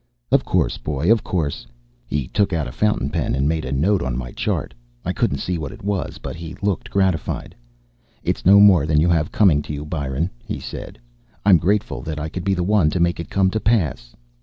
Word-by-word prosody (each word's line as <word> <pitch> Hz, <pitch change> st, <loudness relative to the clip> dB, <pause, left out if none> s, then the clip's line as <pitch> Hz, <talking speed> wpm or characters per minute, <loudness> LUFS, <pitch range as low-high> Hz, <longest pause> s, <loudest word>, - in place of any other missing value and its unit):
"Of -, -, +4 dB
course, -, -, 0 dB
boy. 75 Hz, +6 st, 0 dB
Of 115 Hz, -2 st, +3 dB
course." 75 Hz, -8 st, -2 dB, 0.4 s
He 70 Hz, -4 st, -2 dB
took 100 Hz, +5 st, 0 dB
out 80 Hz, -4 st, -1 dB
a -, -, -6 dB
fountain 105 Hz, -3 st, 0 dB
pen 80 Hz, -5 st, -1 dB
and 70 Hz, +1 st, +1 dB
made 80 Hz, -1 st, -1 dB
a 65 Hz, -, -4 dB
note 90 Hz, +9 st, +2 dB
on 60 Hz, -1 st, -2 dB
my -, -, -5 dB
chart; -, -, -2 dB, 0.3 s
I -, -, -1 dB
couldn't -, -, 0 dB
see 90 Hz, -2 st, -2 dB
what 75 Hz, -4 st, -5 dB
it -, -, -12 dB
was, 100 Hz, -1 st, -2 dB
but -, -, -7 dB
he 85 Hz, -1 st, -8 dB
looked 100 Hz, -4 st, -1 dB
gratified. 95 Hz, -8 st, -1 dB, 0.7 s
"It's -, -, -1 dB
no 100 Hz, +3 st, +7 dB
more 95 Hz, -7 st, +6 dB
than 75 Hz, -1 st, +3 dB
you 85 Hz, +3 st, +3 dB
have 80 Hz, -3 st, +1 dB
coming 90 Hz, -9 st, +4 dB
to 75 Hz, -, -7 dB
you, 75 Hz, +1 st, -5 dB
Byron," 75 Hz, +2 st, -2 dB
he -, -, -5 dB
said. -, -, -8 dB, 0.5 s
"I'm 95 Hz, -5 st, +7 dB
grateful 100 Hz, +6 st, 0 dB
that 80 Hz, -1 st, -5 dB
I 80 Hz, +1 st, -3 dB
could 90 Hz, +2 st, -5 dB
be 95 Hz, 0 st, +1 dB
the 90 Hz, -, -1 dB
one 95 Hz, -4 st, +3 dB
to 90 Hz, -, -2 dB
make 85 Hz, 0 st, +1 dB
it 85 Hz, -, -6 dB
come 95 Hz, -1 st, +2 dB
to 110 Hz, -, -1 dB
pass." 75 Hz, -, 0 dB
80 Hz, 225 wpm, -21 LUFS, 75-95 Hz, 0.7 s, no